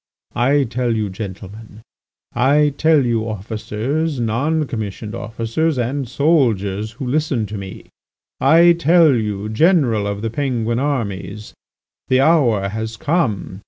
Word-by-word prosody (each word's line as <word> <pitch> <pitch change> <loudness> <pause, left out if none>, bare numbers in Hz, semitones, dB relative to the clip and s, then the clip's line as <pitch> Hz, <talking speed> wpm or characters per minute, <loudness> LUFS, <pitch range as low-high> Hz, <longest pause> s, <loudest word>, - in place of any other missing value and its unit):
I 135 +4 +2
tell 120 -1 -1
you, 105 -3 -2
gentlemen, 105 +2 -9 0.5
I 145 +4 +3
tell 155 -3 +3
you 115 -1 -1
officers, 115 - -3
non 140 +8 0
commissioned 110 -4 -6
officers, 115 +8 -2
and 125 +1 -2
soldiers 110 - +1
who 130 +4 -7
listen 135 -3 0
to 105 - -7
me, 95 -1 -9 0.5
I 165 +5 +6
tell 165 -2 +4
you 105 -3 -2
General 115 - +2
of 100 +1 -4
the 115 - -2
Penguin 120 -3 -1
armies, 105 -7 -3 0.5
the 130 - +3
hour 130 -10 +3
has 110 +2 -5
come! 115 - -1
115 Hz, 125 wpm, -19 LUFS, 105-145 Hz, 0.5 s, I